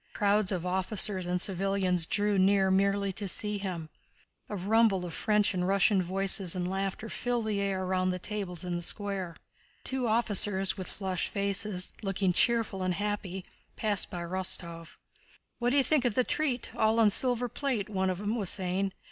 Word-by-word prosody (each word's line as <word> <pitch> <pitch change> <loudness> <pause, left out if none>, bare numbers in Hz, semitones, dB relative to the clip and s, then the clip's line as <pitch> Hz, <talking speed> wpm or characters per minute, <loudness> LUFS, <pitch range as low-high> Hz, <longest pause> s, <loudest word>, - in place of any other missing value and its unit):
Crowds 205 -1 +2
of 180 -2 -2
officers 190 0 0
and 180 0 0
civilians 185 -2 0
drew 205 -1 +1
near 190 0 +4
merely 200 0 +1
to 200 +1 -2
see 210 +2 -2
him. 180 -5 -4 0.6
A 210 - -4
rumble 200 -1 +2
of 170 +4 -7
Russian 210 -3 +3
and 180 - 0
French 195 0 +3
voices 190 0 +2
and 180 -1 -2
laughter 195 +3 -3
filled 240 0 -2
the 210 -2 -1
air 190 -1 -1
round 185 0 0
the 180 - -2
tables 185 -3 -3
in 175 -1 -2
the 175 - -3
square. 190 -2 -3 0.5
Two 260 -2 -2
officers 205 -4 +2
with 185 -2 -6
flushed 190 -3 -2
faces, 200 -1 -1
looking 195 -2 0
cheerful 225 -3 +2
and 185 -1 0
happy, 200 -2 -3 0.3
passed 210 -3 0
by 175 -1 -5
Rostóv. 170 -2 -4 0.6
"What 240 0 +1
d'you 275 +2 +3
think 300 -1 +2
of 245 -4 0
the 255 - +3
treat? 260 -3 -1
All 220 +1 +2
on 215 -2 +5
silver 245 +2 +2
plate," 245 -5 -2
one 190 -3 -1
of 185 - -2
them 210 +3 -2
was 205 -6 +1
saying. 190 0 0
195 Hz, 175 wpm, -29 LUFS, 185-210 Hz, 0.6 s, on